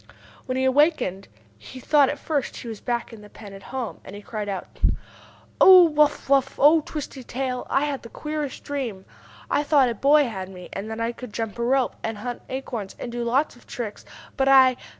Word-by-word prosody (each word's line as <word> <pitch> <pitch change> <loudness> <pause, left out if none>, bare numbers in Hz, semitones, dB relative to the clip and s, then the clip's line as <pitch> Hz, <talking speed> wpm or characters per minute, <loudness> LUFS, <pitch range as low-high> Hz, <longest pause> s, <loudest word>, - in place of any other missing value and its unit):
When 255 0 -2
he 260 - +1
awakened, 260 - +2 0.3
he 255 - -11
thought 285 +1 +4
at 290 - -3
first 285 -1 -3
he - - -8
was 220 -3 -7
back 240 -1 -3
in 220 - -11
the 210 - -14
pen 205 -1 -12
at 195 - -11
home, 255 0 -6
and 195 - -10
he 205 - -10
cried 210 -2 -5
out: 195 -2 -4 0.9
"Oh, 370 -1 +10
Wuff 300 -3 +2
Wuff! 275 -1 +2
Oh, 310 +3 +6
Twisty 290 -3 -7
Tail. 255 0 -4
I 275 - +2
had 285 -2 -3
the 230 - -11
queerest 300 0 -5
dream! 245 -10 -4 0.4
I - - +1
thought 285 -4 +3
a - - -1
boy 285 +5 +4
had 190 -5 -6
me, 180 -2 -11
and 200 +3 -5
that 220 0 -5
I 230 +1 -1
could 245 -1 -10
jump 225 +1 -4
a - - 0
rope, 260 +1 +1
and 225 -1 -3
hunt 240 +3 -5
acorns, 245 -6 -5
and 240 - -6
do 240 0 -3
lots 255 +5 0
of 240 - -21
tricks. 225 -4 -6 0.3
But 270 -1 +2
I 260 -2 +7
255 Hz, 210 wpm, -24 LUFS, 220-280 Hz, 0.9 s, Oh